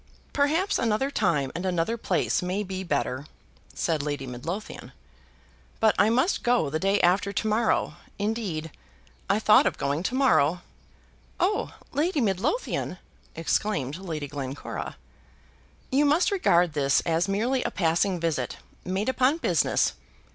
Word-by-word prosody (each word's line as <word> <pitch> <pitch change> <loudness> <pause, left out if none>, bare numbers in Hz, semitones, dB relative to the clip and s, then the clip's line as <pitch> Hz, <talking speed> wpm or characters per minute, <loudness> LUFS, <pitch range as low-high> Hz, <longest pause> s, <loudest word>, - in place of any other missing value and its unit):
"Perhaps 320 +8 +1
another 230 +4 0
time 150 - +1
and 175 - -4
another 180 +3 0
place 235 - 0
may 185 +3 -2
be 190 -1 -5
better," 140 -4 -2 0.5
said 160 -3 0
Lady 145 -2 -3
Midlothian; 165 - -6 0.9
"but 220 -1 +4
I 205 - +5
must 260 - +2
go 240 - +2
the 155 - -1
day 195 +3 +2
after 190 +3 +3
to 210 +2 -2
morrow, 220 +1 +1 0.2
indeed, 200 -7 -2 0.6
I 200 - +3
thought 215 -1 +5
of - - -2
going 140 +3 -1
to 235 +7 -2
morrow." 175 - +3 0.8
"Oh, 410 +4 0 0.2
Lady 310 +3 0
Midlothian!" 225 - -1 0.4
exclaimed 165 -4 -1
Lady 160 -6 -5
Glencora. 140 -1 -6 0.9
"You 280 +3 +3
must 305 +7 +3
regard 175 - +3
this 140 -2 +2
as 165 +2 0
merely 235 +7 0
a - - -1
passing 175 +2 +1
visit, 155 -7 -2 0.3
made 190 +3 -2
upon 260 +3 +2
business. 175 - +1
190 Hz, 135 wpm, -26 LUFS, 160-235 Hz, 0.9 s, I